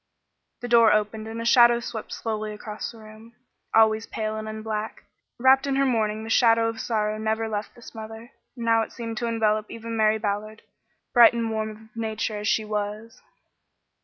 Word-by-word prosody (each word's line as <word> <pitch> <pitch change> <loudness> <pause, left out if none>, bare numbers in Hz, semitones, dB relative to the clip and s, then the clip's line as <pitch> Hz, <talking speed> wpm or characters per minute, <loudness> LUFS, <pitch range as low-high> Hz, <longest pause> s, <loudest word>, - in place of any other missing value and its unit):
The 245 - -4
door 235 -2 +6
opened 215 +1 0
and 225 +1 -6
a 230 - -4
shadow 240 0 +6
swept 230 -2 -7
slowly 215 -1 -4
across 210 0 -6
the 235 - -15
room. 220 +1 -14 0.4
Always 220 0 +3
pale 215 0 -3
and 215 0 -5
in 215 0 -7
black 215 0 -4 0.3
wrapped 265 +2 +4
in 275 - 0
her 275 0 +2
mourning 220 -4 0
the 225 - -7
shadow 230 -1 +4
of 225 -1 -6
sorrow 215 -2 -1
never 220 +1 -1
left 210 -1 -5
this 240 - -13
mother; 225 +1 -9 0.2
and 235 -2 -6
now 225 0 +4
it 225 - -5
seemed 230 -2 -6
to 235 - -2
envelop 215 -2 0
even 230 0 -6
Mary 215 0 +3
Ballard, 215 0 -4 0.5
bright 240 -2 +8
and 230 -1 -2
warm 220 0 -2
of 220 +1 -14
nature 220 -1 -3
as 210 - -4
she 220 0 +1
was. 210 +1 -5
220 Hz, 190 wpm, -25 LUFS, 215-230 Hz, 0.5 s, bright